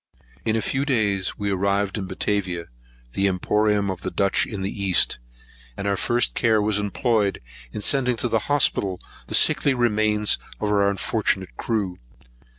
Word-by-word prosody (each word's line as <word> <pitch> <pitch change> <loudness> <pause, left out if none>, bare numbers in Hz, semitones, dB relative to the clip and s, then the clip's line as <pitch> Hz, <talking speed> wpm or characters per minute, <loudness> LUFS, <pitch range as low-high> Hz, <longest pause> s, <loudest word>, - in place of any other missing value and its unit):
In 110 - +1
a 110 - 0
few 135 +1 0
days, 105 -9 0
we 100 -1 -2
arrived 100 +1 0
at 100 -4 -4
Batavia, 95 -3 -2 0.4
the 100 +6 +2
emporeum 105 +2 +1
of 95 - -7
the - - -3
Dutch 100 -1 +1
in 100 -3 -5
the 100 +1 -4
East; 90 -9 +2 0.6
and 100 - -3
our 100 - +2
first 120 +4 0
care 110 -3 +3
was 105 0 +1
employed 105 0 0 0.3
in 105 - -5
sending 125 -2 +2
to 120 - -1
the 115 -1 +1
hospital 105 -9 +2 0.3
the - - -1
sickly 140 -2 +3
remains 110 -3 +1 0.2
of 105 - -1
our 100 -1 +3
unfortunate 100 -1 -1
crew. 100 -6 -2
105 Hz, 160 wpm, -23 LUFS, 100-110 Hz, 0.6 s, care